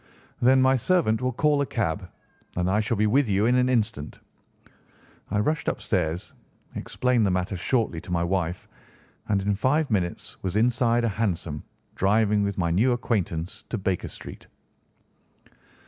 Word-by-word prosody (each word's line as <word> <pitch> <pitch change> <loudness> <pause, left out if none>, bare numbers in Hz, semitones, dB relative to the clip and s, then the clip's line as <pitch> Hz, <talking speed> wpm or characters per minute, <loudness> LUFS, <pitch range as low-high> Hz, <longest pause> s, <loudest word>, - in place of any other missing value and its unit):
"Then 130 +2 +5
my 130 0 +5
servant 125 -6 +2
will 130 0 0
call 145 +3 +2
a - - +1
cab, 90 -4 -2 0.5
and 90 +1 +1
I 105 - +2
shall 110 +1 0
be 105 - +2
with 125 +3 +3
you 100 +2 +2
in 120 - +3
an 125 0 +3
instant." 110 - -1 1.1
I 105 - -1
rushed 150 +9 0
upstairs, 90 0 -1 0.4
explained 125 -2 0
the 100 - +3
matter 95 +1 -1
shortly 95 -3 0
to - - -10
my 85 -1 +1
wife, 90 -1 -2 0.6
and 100 -2 +1
in 100 +1 +1
five 135 +7 +1
minutes 90 -4 -2
was 95 0 -3
inside 120 +1 +2
a - - +2
hansom, 90 -8 -2 0.3
driving 105 +1 +2
with 100 -1 -1
my 85 -3 0
new 115 +9 +3
acquaintance 95 -8 -2
to 115 - -2
Baker 95 -3 -1
Street. - - -10
105 Hz, 160 wpm, -25 LUFS, 90-120 Hz, 1.1 s, Then